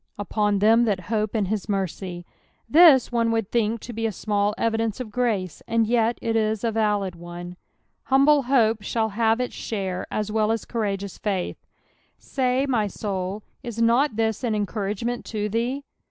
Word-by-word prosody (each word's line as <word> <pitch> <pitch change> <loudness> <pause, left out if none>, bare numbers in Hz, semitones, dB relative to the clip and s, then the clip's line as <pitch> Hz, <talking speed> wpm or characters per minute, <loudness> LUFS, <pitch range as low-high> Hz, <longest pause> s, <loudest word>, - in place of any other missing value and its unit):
" - - -55
Upon 205 0 0
them 225 +4 +5
that 205 -4 0
hops 215 0 0
in 210 -3 +1
hit 210 +3 -1
mfrey." 185 -2 -3 0.5
Thig^nu 265 -8 +6
would 225 -3 -1
think 230 -1 0
to 240 - -8
be 225 0 -1
a - - -2
small 205 +1 0
evidence 225 -1 0
of 240 -4 -6
grace, 210 -7 -1
and 230 -1 +2
yetjc 230 +1 +1
is 220 -1 0
a 230 - +1
valid 210 -4 0
one. 175 +1 -8 0.5
(fumble 275 +2 +4
hope 230 -4 +3
shall 220 +1 -1
have 225 +2 +1
its 250 - -2
share 190 -4 -4
as 210 0 -2
well 215 0 +2
as 225 -1 -2
courageous 200 -4 -3
fsit^ 195 -4 -2 0.6
Say, 260 0 0
my 230 -6 +1
soul, 195 0 -4 0.2
is 235 -3 -6
not 235 +3 +3
this 220 -1 0
sn 235 -4 -1
encour 200 -1 -3
agement 235 +4 -3
to 210 -2 -2
thee 240 +6 -1
220 Hz, 170 wpm, -24 LUFS, 205-235 Hz, 0.6 s, Thig^nu